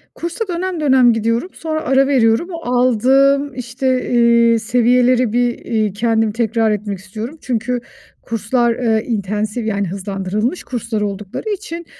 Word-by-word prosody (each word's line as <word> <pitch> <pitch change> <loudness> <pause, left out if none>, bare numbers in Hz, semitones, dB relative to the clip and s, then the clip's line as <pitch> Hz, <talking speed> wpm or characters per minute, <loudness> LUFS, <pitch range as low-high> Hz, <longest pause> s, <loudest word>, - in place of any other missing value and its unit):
Kursa 340 +6 -4
dönem 360 0 -3
dönem 260 -5 +4
gidiyorum, 230 - -1
sonra 315 -1 -3
ara 270 +1 +2
veriyorum. 250 +5 +2
O 335 -1 -6
aldığım, 270 +4 +3
işte, 255 +1 -2
eee, 235 -1 +4
seviyeleri 245 +1 +2
bir, 245 -1 +1
eee, 215 -4 -1
kendim 225 0 +1
tekrar 225 -1 0
etmek 205 -2 -3
istiyorum. 220 +10 -7
Çünkü 245 0 -2 0.4
kurslar, 230 +2 0
eee, 225 -3 0
intensive 210 +1 -2
yani 200 -2 -1
hızlandırılmış 195 - -3
kurslar 230 -3 -3
oldukları 205 - -4
için 365 -5 -5
235 Hz, 135 wpm, -18 LUFS, 220-265 Hz, 0.4 s, dönem